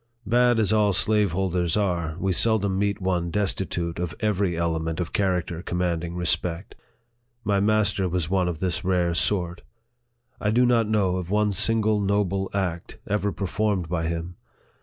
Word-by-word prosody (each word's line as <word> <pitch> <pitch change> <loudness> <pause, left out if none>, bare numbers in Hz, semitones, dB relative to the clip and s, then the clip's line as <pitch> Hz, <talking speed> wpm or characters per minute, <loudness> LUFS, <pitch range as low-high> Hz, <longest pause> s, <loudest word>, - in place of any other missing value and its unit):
Bad 120 +2 +3
as 110 -1 +3
all 105 -2 +3
slaveholders 95 -4 +1
are, 85 -6 -1
we 95 0 0
seldom 100 -2 +2
meet 100 0 0
one 90 -2 -1
destitute 90 -3 -2
of 90 -2 -3
every 100 -5 0
element 80 -1 -2
of 85 - -4
character 90 -4 -1
commanding 85 -1 -2
respect. 85 +1 -1 0.7
My 100 -2 +1
master 105 -2 +1
was 85 -2 -1
one 95 0 +1
of 85 -2 -3
this 90 +1 -1
rare 90 -2 +1
sort. 90 0 0 0.8
I 105 - 0
do 120 +4 +3
not 115 -3 +2
know 95 -4 +1
of 90 -2 -5
one 105 +1 +1
single 110 +1 +2
noble 100 -1 0
act 90 -4 -3
ever 105 0 -1
performed 100 -2 -2
by 80 -2 -1
him. 85 +1 -4
95 Hz, 155 wpm, -24 LUFS, 85-105 Hz, 0.8 s, Bad